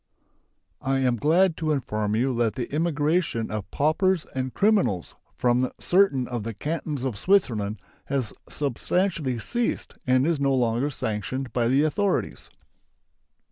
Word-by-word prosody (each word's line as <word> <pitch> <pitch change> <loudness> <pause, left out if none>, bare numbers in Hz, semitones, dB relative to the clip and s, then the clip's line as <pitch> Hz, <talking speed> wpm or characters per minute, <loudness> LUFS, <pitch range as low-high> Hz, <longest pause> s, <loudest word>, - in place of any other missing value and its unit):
I 135 0 0
am 125 -2 +2
glad 170 - +3
to 155 -1 -1
inform 110 -7 -1
you 130 +4 +1
that 115 -2 +1
the 130 +1 -4
immigration 150 -5 0
of 105 -2 -4
paupers 160 +4 +1
and 130 0 -2
criminals 195 - +1 0.2
from 125 +1 +2
certain 175 -9 +3
of 120 -2 -3
the 115 +1 -5
Cantons 150 +1 -3
of 125 -7 -2
Switzerland 115 - +1 0.3
has 135 -5 -2 0.2
substantially 150 0 -1
ceased 240 - -2
and 130 +1 +4
is 165 -2 +1
no 140 -1 +2
longer 120 +2 +1
sanctioned 125 +1 -3
by 120 -2 +1
the 135 +4 +3
authorities. 195 +6 -1
135 Hz, 140 wpm, -25 LUFS, 120-160 Hz, 0.3 s, and